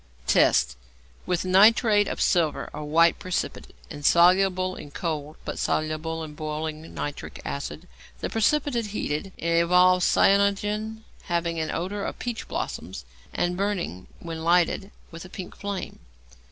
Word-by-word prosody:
Tests. 60 0 +3 0.5
With 180 0 0
nitrate 205 +2 +5
of - - -4
silver 165 -5 +1
a - - -5
white 165 +3 +3
precipitate, 185 - -4 0.2
insoluble 185 +4 +3
in 145 - -9
cold, 155 -1 -4
but - - -4
soluble 155 +1 -1
in 155 -1 -8
boiling, 155 +1 -5
nitric 145 0 -6
acid. 150 +4 -5 0.3
The - - -2
precipitate 240 0 +1
heated, 195 -3 -3
evolves 180 +2 +4
cyanogen, 210 +2 +2 0.2
having 170 -2 -1
an 160 - -2
odour 200 +4 -3
of - - -4
peach 240 -2 -5
blossoms, 60 - -5 0.3
and 175 0 -1
burning, 185 - -2
when 165 -1 -6
lighted, 175 +3 +2 0.2
with 165 0 -8
a 185 - -11
pink 185 -1 -8
flame. 200 -2 -5
175 Hz, 130 wpm, -25 LUFS, 160-200 Hz, 0.5 s, nitrate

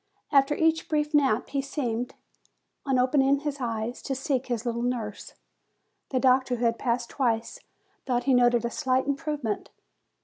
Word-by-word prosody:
After 275 0 +4
each 320 0 +1
brief 300 0 0
nap 270 -6 +2
he 275 -1 -1
seemed, 250 -4 -3 0.7
on 265 -1 +2
open 260 +3 +3
ing 275 +1 +3
his 295 -1 -3
eyes, 230 0 -3
to 270 - -3
seek 270 -1 -1
his 240 -2 -2
little 235 0 -1
nurse. 235 -4 -4 0.7
The 260 - 0
doctor, 255 0 +3
who 240 0 -1
had 230 0 +1
passed 240 -1 -1
twice, 230 -4 -1 0.5
thought 245 -2 +1
he 270 - +2
noted 240 -1 +4
a 235 - -2
slight 260 +1 +1
improve 285 +1 -2
ment. 215 -2 -3
255 Hz, 170 wpm, -27 LUFS, 235-275 Hz, 0.7 s, After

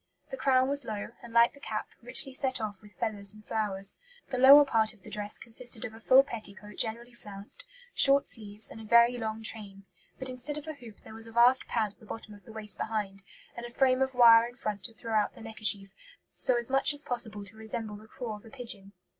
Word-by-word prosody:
The - - -3
crown 260 - +2
was 280 0 +1
low, 215 -3 -5
and, 235 - -12
like 235 0 +4
the 280 - -17
cap, 215 -6 -5
richly 255 +3 0
set 260 -1 -1
off 205 -3 -5
with 210 -1 -18
feathers 210 -3 -2
and 215 0 -16
flowers. 200 -3 -2 0.3
The 255 -2 -3
lower 280 +3 +9
part 220 -4 +1
of 200 - -24
the - - -12
dress 210 0 -2
consisted 240 0 -2
of 220 - -7
a 225 - -12
full 260 +4 +6
petticoat 210 -5 -9
generally 235 +2 -2
flounced, 205 -3 -11 0.3
short 275 0 +5
sleeves, 210 -1 -1
and 225 - -10
a - - -10
very 235 +3 +5
long 220 0 -4
train; 200 -3 -5 0.3
but 260 - -5
instead 255 +3 -3
of 300 - -8
a 315 - -6
hoop 235 -7 -14
there - - -13
was 225 +1 -3
a - - -11
vast 240 +3 +4
pad 220 -3 -1
at - - -36
the 220 - -17
bottom 215 -1 -9
of 205 -3 -16
the - - -12
waist 215 -3 -7
behind, 205 -3 -3 0.3
and 235 - -8
a 240 - -7
frame 255 +1 +2
of 265 -1 -1
wire 230 -1 +7
in 240 - -13
front 210 -5 -5
to 230 - 0
throw 225 0 -6
out 215 -1 +1
the - - -13
neckerchief, 210 -3 -1 0.4
so 255 - +5
as 235 -1 0
much 270 +2 +4
as 290 - -3
possible 220 -4 -2
to 200 +2 -14
resemble 220 -1 -6
the 215 +1 -15
craw 225 -2 -7
of 205 - -18
a - - -12
pigeon. 215 -6 -4
225 Hz, 240 wpm, -29 LUFS, 210-250 Hz, 0.4 s, lower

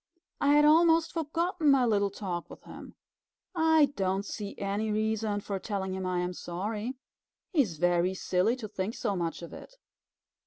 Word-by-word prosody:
I 285 0 +3
had 295 0 +6
almost 325 +1 +5
forgotten 330 +1 0
my 270 -3 +5
little 205 -3 +2
talk 185 -4 -5
with - - -12
him. - - -11 0.6
I 320 -4 +4
don't 195 0 -1
see 205 -1 -6
any 205 +2 -2
reason 215 -1 -1
for 200 -1 -4
telling 190 -2 -3
him 190 -1 -3
I 180 -1 0
am 180 0 -2
sorry. 210 +9 -4 0.6
He 315 - +5
is 180 - -2
very 175 +2 +2
silly 185 +5 +1
to 240 -4 -7
think 205 +1 -4
so 205 -4 -1
much 170 -1 -3
of 170 - -9
it." - - -11
210 Hz, 170 wpm, -29 LUFS, 190-280 Hz, 0.6 s, had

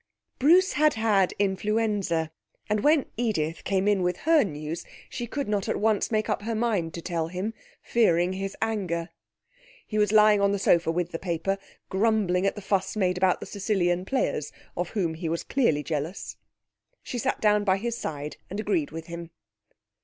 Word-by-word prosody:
Bruce 355 +7 +5
had 305 0 +3
had 210 -4 +3
influenza, 200 -4 0 0.4
and 210 0 +1
when 295 +4 +4
Edith 175 -9 -1
came 195 0 0
in 205 -2 +3
with 180 0 0
her 320 -1 +5
news, 155 -2 -5 0.3
she 240 -2 -4
could 280 +3 -3
not 205 -2 -1
at - - +1
once 215 -1 +1
make 215 -1 0
up - - -1
her 225 +2 -3
mind 215 -8 0
to 170 - -6
tell 165 -3 -1
him, 185 +6 -3 0.3
fearing 180 -6 +2
his 195 +1 -4
anger. 185 -6 -2 0.8
He 215 - -2
was 210 -1 +3
lying 210 -1 +6
on 200 0 +3
the - - +1
sofa 170 -4 +3
with 175 +1 -1
the 165 - -4
paper, 185 +2 -1 0.3
grumbling 195 -2 +2
at - - 0
the 205 - -8
fuss 195 +1 0
made 180 -3 +1
about 185 -1 +2
the - - -5
Sicilian 185 -4 0
players, 190 - -1 0.2
of 175 0 -2
whom 180 -7 -1
he 160 0 -4
was 165 +1 -2
clearly 160 - +1
jealous. 155 +4 -4 0.7
She 245 - -4
sat - - -1
down 210 -1 +3
by 190 -2 +3
his 235 +3 -3
side 150 -8 -5
and 200 - -5
agreed 195 -8 0
with 165 +1 -7
him. 170 0 -7
195 Hz, 185 wpm, -26 LUFS, 170-215 Hz, 0.8 s, lying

